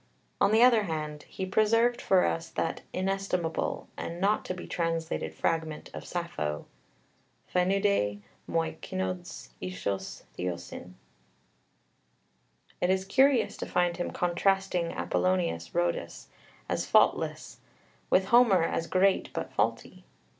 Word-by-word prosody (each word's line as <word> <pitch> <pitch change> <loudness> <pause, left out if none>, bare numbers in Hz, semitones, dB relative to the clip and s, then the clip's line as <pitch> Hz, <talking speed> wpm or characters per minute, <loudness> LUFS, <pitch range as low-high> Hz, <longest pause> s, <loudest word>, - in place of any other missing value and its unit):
On - - +5
the 220 +2 +6
other 235 -4 +6
hand, 155 -3 -4
he 190 - -4
preserved 230 +5 +3
for 185 -2 +4
us 165 - -2
that 165 - -2
inestimable 185 -3 -1
and 170 +1 -5
not 205 +3 +2
to 185 - -3
be 180 - -7
translated 165 -1 -2
fragment 160 -2 -2
of - - -7
Sappho 75 - -3 0.9
φαίνεταί 180 - +2 0.3
μοι 165 -1 -1
κῆνος 95 -1 -4
ἴσος 90 +2 -4 0.2
θεοῖσιν. 90 0 -5 1.9
It 180 - +2
is 190 0 +1
curious 265 +4 +3
to - - -5
find 175 -1 +1
him 175 - -2
contrasting 180 0 +1
Apollonius 180 - -1
Rhodius 85 0 -1 0.4
as - - -1
faultless, - - +2 0.5
with 190 - +4
Homer 230 -8 +6
as 165 0 -1
great 190 +1 +2
but - - -4
faulty. - - -1
180 Hz, 120 wpm, -29 LUFS, 160-195 Hz, 1.9 s, the